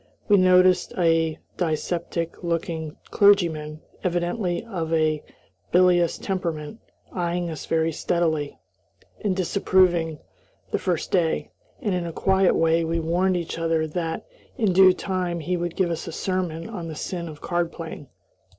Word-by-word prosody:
We 205 - +6
noticed 185 0 +4
a 165 -2 +2 0.2
dyspeptic 170 +1 -2
looking 165 -2 -2 0.2
clergyman, 160 -7 +3 0.2
evidently 175 +2 -1
of 170 -8 -4
a 155 -2 +1 0.5
bilious 175 -1 +4
temperament, 175 0 -3 0.4
eying 175 -1 -1
us 155 - -7
very 165 0 +1
steadily 160 -3 -1 0.7
and 200 -3 +1
disapprovingly 180 -4 +2 0.5
the - - 0
first 175 -3 -2
day, 170 -4 +1 0.3
and 210 -7 0
in 175 -1 -1
a 165 - -6
quiet 190 +1 +3
way 165 0 +3
we 165 +1 -1
warned 180 +3 +1
each 170 -1 -4
other 165 -1 +1
that, 165 +1 -3 0.3
in 215 -7 +2
due 190 0 +8
time, 180 -2 -2
he 175 +3 -1
would 175 -1 -3
give 180 -3 +1
us 165 +1 -4
a - - -4
sermon 170 -2 -2
on 170 -2 -6
the 160 - -6
sin 170 +2 -4
of 150 -2 -10
card 175 -1 -1
playing. 160 -4 -8
170 Hz, 145 wpm, -24 LUFS, 160-185 Hz, 0.7 s, due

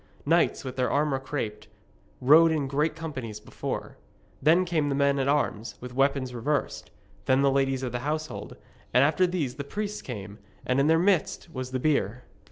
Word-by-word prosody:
Knights, 165 +3 +2
with 130 -1 -6
their 125 -1 +1
armour 145 -2 +1
craped, 110 -7 -5 0.5
rode 160 +5 +7
in 150 -3 0
great 150 +3 0
companies 130 -10 -6
before; - - -6 0.4
then 170 +4 +4
came 160 -4 0
the 140 - 0
men 140 0 +2
at 135 - 0
arms 140 -6 0
with 125 0 -8
weapons 135 -1 +1
reversed; 140 +5 -2 0.4
then 130 +1 +3
the 140 - +4
ladies 135 -1 +1
of 125 - -2
the 120 - -2
household, 155 +4 -4 0.4
and 125 - +7
after 160 +6 +3
these 150 -8 -2
the 140 - -3
priests 210 +8 -4
came, 105 -4 -7 0.3
and 125 +1 +1
in 140 - +3
their 160 +1 +5
midst 175 -1 +1
was 130 -2 -4
the 130 0 -2
bier. 125 -5 0
140 Hz, 180 wpm, -27 LUFS, 125-155 Hz, 0.5 s, rode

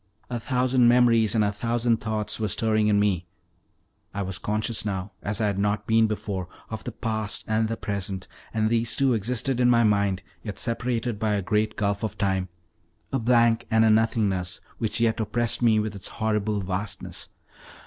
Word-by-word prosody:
A 120 - -2
thousand 125 0 +2
memories 120 -2 +4
and 110 - +4
a 100 - +1
thousand 115 +2 0
thoughts 110 -1 -2
were 110 - 0
stirring 110 +1 +1
in 105 -1 +3
me: 95 -4 +1 0.9
I 100 - -1
was 95 -2 -3
conscious 110 +2 -1
now, 100 -1 -3
as 105 -1 -2
I 110 - +1
had 100 -2 0
not 105 +1 0
been 110 0 +4
before, 100 -4 -3 0.2
of 110 0 -5
the 125 - -5
past 110 -2 -3
and 110 0 +1
the 115 +1 -3
present, 100 -3 -4 0.2
and 110 0 0
these 115 0 +1
two 135 -2 +3
existed 120 +4 0
in 125 -1 +4
my 115 -1 +5
mind, 100 -3 +2 0.2
yet 105 +1 -6
separated 120 -2 -2
by 110 -1 +1
a 100 - -1
great 105 +2 0
gulf 100 -1 -1
of 110 - -3
time 95 -3 0 0.6
a 135 - +2
blank 115 -1 +3
and 110 0 +4
a 110 - +5
nothingness 105 -5 +1 0.2
which 110 0 -1
yet 115 -1 +2
oppressed 115 +2 0
me 110 -2 +4
with 105 0 -2
its 100 - -5
horrible 105 -1 -1
vastness. 95 0 -4
110 Hz, 185 wpm, -25 LUFS, 100-115 Hz, 0.9 s, my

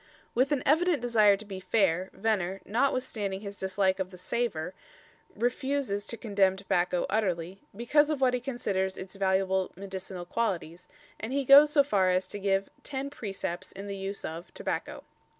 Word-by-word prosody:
With 260 +4 +2
an 285 -3 +1
evident 325 +3 +3
desire 220 -4 +4
to 215 - -11
be 195 -2 -6
fair, 185 -2 +1
Venner, 195 -2 -1
notwithstanding 220 -4 -1
his 200 -1 -8
dislike 190 0 +1
of 185 -1 -2
the 185 - -12
"savour," 180 -4 -2 0.6
refuses 245 -4 -1
to 235 - -5
condemn 200 -4 +2
tobacco 180 -2 0
utterly, 190 -3 -1
because 290 +7 +3
of 305 -3 0
what 255 -2 +3
he 250 - +1
considers 200 -7 -2
its 190 0 -8
valuable 190 -1 +1
medicinal 190 -1 -7
qualities, 180 -5 -2 0.3
and 225 +4 -4
he 280 0 0
goes 285 +3 +9
so 295 -1 +5
far 195 -9 +2
as 185 +1 +2
to 205 - -6
give 195 0 +1
"10 275 0 -4
precepts 195 -8 -5
in 195 +1 -8
the 200 -1 -4
use 195 +1 -5
of" 165 +2 -7
tobacco. - - -4
200 Hz, 170 wpm, -29 LUFS, 190-245 Hz, 0.6 s, goes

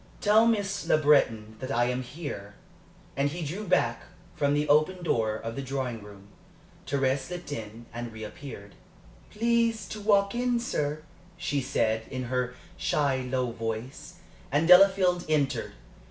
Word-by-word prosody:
"Tell 220 +2 +5
Miss 205 -3 0
Le - - +5
Breton 115 -8 +2
that 130 - -5
I 120 -3 +2
am 125 +1 -1
here." 125 -7 -7 0.6
And 140 +1 +1
he 165 +2 -5
drew 190 +8 -5
back 185 - +2 0.3
from 145 0 +1
the 150 +1 0
open 155 +5 +3
door 110 -9 +1
of 115 +1 -5
the 140 - -3
drawing 130 -4 -3
room. 100 -1 -13 0.6
Thérèse 135 0 +1
slipped 175 -3 -7
in, 115 -2 -7
and 120 0 -5
reappeared. 110 -1 -9 0.6
"Please 230 0 +1
to 215 - -6
walk 200 -1 +3
in, 245 0 +1
sir," 155 - -2 0.3
she 145 -4 -1
said, 110 -4 0
in 130 -1 -4
her 125 0 -1 0.2
shy, 140 -3 +1
low 125 -2 0
voice, 115 +3 -5 0.4
and 150 +4 +2
Delafield 180 -1 +6
entered. 140 -6 0
140 Hz, 150 wpm, -28 LUFS, 120-180 Hz, 0.6 s, Delafield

